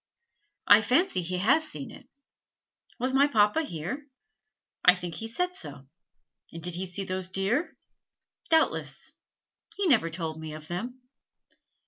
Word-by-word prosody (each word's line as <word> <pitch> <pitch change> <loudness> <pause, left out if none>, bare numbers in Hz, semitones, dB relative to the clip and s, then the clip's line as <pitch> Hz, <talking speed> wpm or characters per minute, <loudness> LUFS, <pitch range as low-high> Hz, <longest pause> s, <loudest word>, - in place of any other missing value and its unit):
"I 205 +1 +8
fancy 255 - +2
he 180 +1 -2
has 240 - +4
seen 150 - -5
it." - - -14 0.9
"Was 255 +2 -1
my 275 +2 +5
papa 215 +2 +3
here?" 265 - -5 0.8
"I 180 - +8
think 175 -2 -6
he 225 - -5
said 360 +10 -1
so." 250 - -5 0.7
"And 165 -1 -9
did 175 0 -1
he 185 +2 -2
see 180 +2 -4
those 185 -1 -3
deer?" 195 - 0 0.7
"Doubtless." 320 -1 +1 0.6
"He 400 - -1
never 225 - +4
told 160 -1 -4
me 155 -1 -6
of 155 0 -10
them." 245 +9 -5
195 Hz, 140 wpm, -28 LUFS, 175-270 Hz, 0.9 s, I